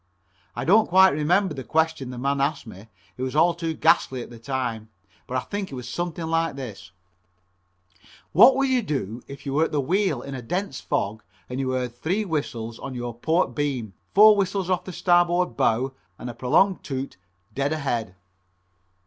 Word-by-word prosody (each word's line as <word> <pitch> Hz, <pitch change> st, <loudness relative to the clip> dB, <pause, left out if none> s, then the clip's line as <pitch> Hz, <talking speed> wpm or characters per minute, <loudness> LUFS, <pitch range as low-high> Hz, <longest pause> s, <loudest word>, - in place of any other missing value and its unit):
I -, -, -3 dB
don't 215 Hz, +6 st, +5 dB
quite 190 Hz, +2 st, +7 dB
remember 170 Hz, +5 st, +2 dB
the 135 Hz, -2 st, -6 dB
question 160 Hz, -2 st, 0 dB
that 125 Hz, -, -7 dB
man 140 Hz, +2 st, 0 dB
asked 140 Hz, 0 st, -1 dB
me, 105 Hz, -1 st, -12 dB, 0.3 s
it -, -, -7 dB
was 130 Hz, +1 st, -3 dB
all 170 Hz, +3 st, +4 dB
too 165 Hz, -1 st, -3 dB
ghastly 130 Hz, -4 st, +2 dB
at -, -, -12 dB
the 120 Hz, -, -11 dB
time, 115 Hz, -3 st, -3 dB, 0.4 s
but 130 Hz, -, -2 dB
I -, -, 0 dB
think 200 Hz, +1 st, -5 dB
it -, -, -6 dB
was 125 Hz, -1 st, -7 dB
something 170 Hz, +4 st, -4 dB
like 165 Hz, -2 st, 0 dB
this: 110 Hz, -8 st, -8 dB, 1.4 s
"What 260 Hz, +1 st, +7 dB
would 275 Hz, 0 st, +2 dB
you 260 Hz, -2 st, +2 dB
do 125 Hz, -, -3 dB
if 140 Hz, 0 st, -10 dB
you 135 Hz, -, -3 dB
were 155 Hz, +3 st, +3 dB
at -, -, -5 dB
the 150 Hz, -, 0 dB
wheel 170 Hz, -1 st, 0 dB
in 140 Hz, -, -7 dB
a 130 Hz, -, -5 dB
dense 180 Hz, -, -3 dB
fog 110 Hz, +2 st, -2 dB, 0.3 s
and 125 Hz, +1 st, -5 dB
you 135 Hz, -1 st, -1 dB
heard 125 Hz, -2 st, -2 dB
three 185 Hz, -, -1 dB
whistles 115 Hz, -, -4 dB
on 135 Hz, -2 st, -6 dB
your 120 Hz, -1 st, -4 dB
port 160 Hz, +9 st, 0 dB
beam, 130 Hz, -8 st, -2 dB, 0.2 s
four 210 Hz, +1 st, +8 dB
whistles 195 Hz, -1 st, -1 dB
off 180 Hz, -, 0 dB
the 185 Hz, -, -6 dB
starboard 175 Hz, -3 st, +2 dB
bow, 125 Hz, +5 st, +1 dB, 0.2 s
and 120 Hz, -, -6 dB
a -, -, -12 dB
prolonged 155 Hz, +11 st, +2 dB
toot 135 Hz, -6 st, -5 dB, 0.4 s
dead 140 Hz, +3 st, -1 dB
ahead?" 120 Hz, -11 st, -2 dB
140 Hz, 190 wpm, -24 LUFS, 125-175 Hz, 1.4 s, four